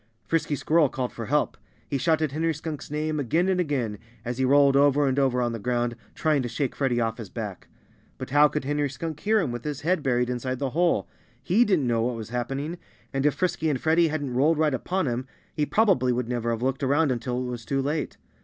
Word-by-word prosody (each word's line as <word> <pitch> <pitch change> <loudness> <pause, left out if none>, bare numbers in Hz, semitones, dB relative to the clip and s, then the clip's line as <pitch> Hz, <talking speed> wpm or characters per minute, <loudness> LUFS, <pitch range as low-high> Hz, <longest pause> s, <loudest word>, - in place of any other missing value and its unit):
Frisky 165 -2 0
Squirrel 155 +1 +3
called 125 -1 -3
for 115 -2 -6
help. 150 +2 +1 0.3
He 140 - -1
shouted 155 0 +1
Henry 160 +2 0
Skunk's 155 -1 -6
name 150 +1 -2
again 160 +7 +1
and 190 -1 +1
again, 130 - -1 0.3
as 120 +2 -3
he - - +2
rolled 140 +1 +5
over 145 +1 +4
and 135 +1 +1
over 125 -2 +2
on 120 - 0
the 115 - -4
ground, 120 +1 -1 0.2
trying 155 -3 +2
to 120 - -3
shake 130 +2 -2
Freddie 130 -4 +1
off 115 0 -1
his 110 -5 -7
back. 105 -5 -6 0.5
But 130 0 -7
how 145 +2 +6
could 150 -2 -3
Henry 145 0 0
Skunk 155 +3 -5
hear 215 +4 +2
him, 165 -10 -1
with 120 -1 -5
his 145 -2 -4
head 175 +1 +1
buried 125 -3 +1
inside 130 +1 -3
the 135 0 -2
hole? 170 +4 +1 0.4
He 195 - +4
didn't 185 - +2
know 115 -2 +1
what 120 +1 0
was 110 -2 -7
happening. 135 +7 -3 0.3
And 135 +1 +2
if 145 - +1
Frisky 175 -3 0
and 135 -4 0
Freddie 165 +1 +3
hadn't 145 -4 -3
rolled 150 +6 +3
right 155 -2 +2
upon 180 +8 -1
him 125 0 -2 0.3
he 150 -1 0
probably 195 - +3
would 125 -1 -1
never 120 -1 -2
have 115 0 -2
looked 135 +1 0
around 140 +2 +2
until 125 0 -2
it 130 - -2
was 120 -1 -6
too 135 +4 -1
late. 145 +3 -2
140 Hz, 230 wpm, -26 LUFS, 125-155 Hz, 0.5 s, how